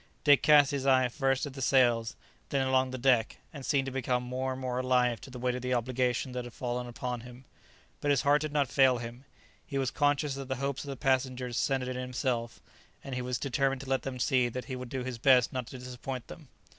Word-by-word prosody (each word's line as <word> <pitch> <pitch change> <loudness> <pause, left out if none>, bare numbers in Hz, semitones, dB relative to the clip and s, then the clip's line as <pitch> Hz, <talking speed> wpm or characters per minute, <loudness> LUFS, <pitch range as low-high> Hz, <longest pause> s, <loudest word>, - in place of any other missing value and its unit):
Dick 145 -2 +6
cast 145 -1 +6
his 140 -1 -2
eye 130 -1 +5
first 135 +1 0
at 145 - -7
the 135 - -7
sails, 120 -3 +3 0.3
then 135 -1 +1
along 130 0 +2
the 130 - -5
deck, 125 -3 +2 0.2
and 140 -3 -8
seemed 135 0 +1
to 135 - -4
become 125 -1 -1
more 130 +1 -2
and 130 - -7
more 125 -1 -2
alive 125 -2 +2
to - - -10
the 125 - -9
weight 125 0 0
of 125 - -4
the 125 0 0
obligation 125 +1 0
that 125 0 -4
had 120 -1 -10
fallen 125 0 -3
upon 120 0 -4
him; 125 +2 -13 0.5
but 145 - -1
his 140 -2 +3
heart 145 +1 +4
did 155 -1 -3
not 145 -2 +1
fail 130 -1 +4
him; 120 +3 -8 0.4
he 140 - -5
was 130 -2 0
conscious 145 -1 +1
that 135 -1 -6
the 130 - -2
hopes 140 +1 -3
of 145 - -8
the 135 - -5
passengers 130 -2 0
centred 130 -1 0
in 130 - -4
himself, 125 -2 -3 0.4
and 135 - -7
he 125 - -2
was 125 0 -2
determined 135 0 0
to 135 - -9
let 135 - +2
them 135 -2 -5
see 125 0 +2
that 125 +2 -5
he 130 - -5
would 125 -1 -7
do 130 0 -3
his 125 -2 -5
best 125 -1 +4
not 130 -2 -3
to 130 - -8
disappoint 125 0 -6
them. 155 -4 -11
130 Hz, 245 wpm, -30 LUFS, 125-135 Hz, 0.5 s, Dick